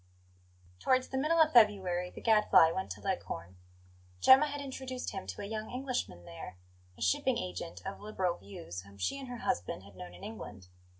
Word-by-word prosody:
TOWARDS 255 - +2
the 265 - -2
middle 320 +4 +2
of 315 -1 +5
February 190 -6 +4
the - - -11
Gadfly 210 -7 +6
went 190 +2 -3
to - - -14
Leghorn. 95 - -4 0.6
Gemma 270 - +8
had 290 0 -4
introduced 260 -2 -5
him - - -6
to 95 - -5
a - - -4
young 215 +1 -4
Englishman 250 - -3
there, 85 +2 -9 0.4
a - - -15
shipping 90 - +2
agent 90 -1 -5
of - - -5
liberal 190 -4 -1
views, 95 -3 -8
whom 100 +1 -16
she 95 - -1
and 270 - -7
her 245 -2 -7
husband 90 +1 -1
had 100 -1 -15
known 90 -1 -9
in 90 - -13
England. 105 -4 -8
185 Hz, 185 wpm, -32 LUFS, -, 0.6 s, Gemma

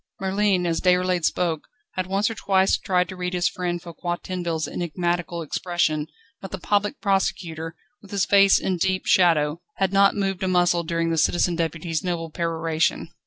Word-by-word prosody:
Merlin, 195 -1 +1
as 165 -1 0
Déroulède 180 -2 +2
spoke, 165 -4 -1 0.2
had 185 -1 -3
once 195 +2 +1
or 225 - -2
twice 195 -3 +2
tried 180 -2 0
to 185 - -6
read 180 0 -3
his 175 0 +2
friend 175 -1 -2
Foucquier 175 0 -4
Tinville's 170 -4 -3
enigmatical 175 0 -2
expression, 155 -1 -1 0.3
but 195 - -7
the 190 - -5
Public 205 +7 0
Prosecutor, 180 -5 -1 0.3
with 200 - -16
his 200 -1 0
face 200 -1 +6
in 185 -1 -1
deep 185 +2 0
shadow, 165 -3 +3
had 195 0 0
not 195 0 +5
moved 195 -2 -1
a 190 - 0
muscle 175 -1 +3
during 165 0 -1
the 165 - +1
Citizen 175 +2 +2
Deputy's 165 -1 -2
noble 170 -3 -3
peroration. 165 -1 -1
180 Hz, 170 wpm, -24 LUFS, 165-190 Hz, 0.3 s, face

